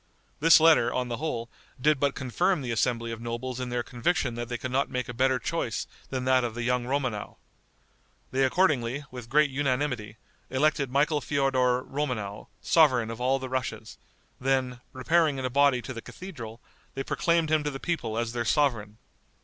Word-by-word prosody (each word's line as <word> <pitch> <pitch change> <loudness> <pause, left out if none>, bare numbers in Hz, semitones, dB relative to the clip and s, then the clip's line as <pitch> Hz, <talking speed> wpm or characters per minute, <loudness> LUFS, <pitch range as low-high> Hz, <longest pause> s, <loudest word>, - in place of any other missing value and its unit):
This 165 +2 +7
letter, 155 -7 +5
on 125 0 -2
the 120 - -3
whole, 125 -5 -3 0.3
did 150 +2 +3
but 140 0 +1
confirm 140 - 0
the 120 - -3
assembly 115 0 0
of 115 0 -6
nobles 120 +2 -4
in 125 -1 -3
their 120 0 -1
conviction 125 +1 -1
that 120 0 -5
they 120 - -2
could 130 +1 -5
not 135 +2 +1
make 125 -1 -3
a 125 - -6
better 130 +2 +2
choice 115 - -2 0.2
than 130 -1 -3
that 130 -1 +4
of 115 -2 -3
the 120 - -3
young 125 0 0
Romanow. 130 -5 -2 0.9
They 135 +1 +2
accordingly, 140 -3 +1
with 125 -2 -9
great 150 +1 +4
unanimity, 130 -5 -1 0.3
elected 140 0 +1
Michael 145 +3 +2
Feodor 130 -3 +1
Romanow, 125 -9 -4
sovereign 130 -8 +4
of 115 +1 -7
all 130 +2 +2
the 130 -1 -5
Russias; 130 -1 -4 0.4
then, 130 -1 0
repairing 150 +3 +2
in 130 - -3
a 130 - -2
body 140 -2 +3
to 130 - -6
the 115 - -7
cathedral, 120 - -9 0.3
they 135 - -2
proclaimed 170 0 +1
him 155 -1 +3
to 150 - -1
the 135 -2 -6
people 120 -11 -2
as 115 0 -2
their 120 -1 -1
sovereign. 115 -6 +1
130 Hz, 185 wpm, -27 LUFS, 120-145 Hz, 0.9 s, This